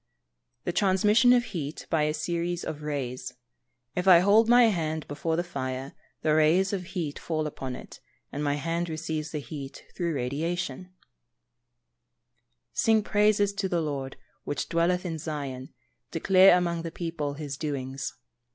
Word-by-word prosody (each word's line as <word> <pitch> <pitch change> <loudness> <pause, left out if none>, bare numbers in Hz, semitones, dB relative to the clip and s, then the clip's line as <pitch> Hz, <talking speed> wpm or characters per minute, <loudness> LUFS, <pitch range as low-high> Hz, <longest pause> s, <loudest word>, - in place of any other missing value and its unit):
_ - - -52
The 175 - -2
transmission 210 +6 +4
of 245 -1 +5
heat 160 -9 -5
by 155 -2 +3
a 150 - 0
series 170 +2 -2
of 155 -1 -5
rays. 130 -4 -4 0.6
If 180 +1 -1
I 180 -2 +10
hold 205 +5 +5
my 245 0 +7
hand 160 -8 0
before 160 +3 -2
the 175 - 0
fire, 135 -5 -4 0.3
the 155 - +3
rays 165 +6 +3
of 190 -2 -2
heat 155 -5 -3
fall 155 -2 -2
upon 130 -4 -5
it, - - -11 0.3
and 145 - -3
my 145 -1 +1
hand 165 +4 -2
receives 160 -1 -3
the 155 - -4
heat 140 -2 -7
through 170 -3 -1
radiation. 165 +9 -2
[Verse: 120 -5 -14
"Sing 220 -1 +4
praises 205 -1 +3
to 200 -1 -2
the 175 - +1
Lord, 140 -4 -3 0.3
which 145 -2 -3
dwelleth 175 +2 +1
in 165 -3 -3
Zion, 140 -4 -5 0.4
declare 185 +3 +6
among 170 -2 -1
the 165 - -4
people 165 -4 -4
his 145 -2 -5
doings." 135 -2 -4
160 Hz, 160 wpm, -27 LUFS, 140-180 Hz, 0.6 s, I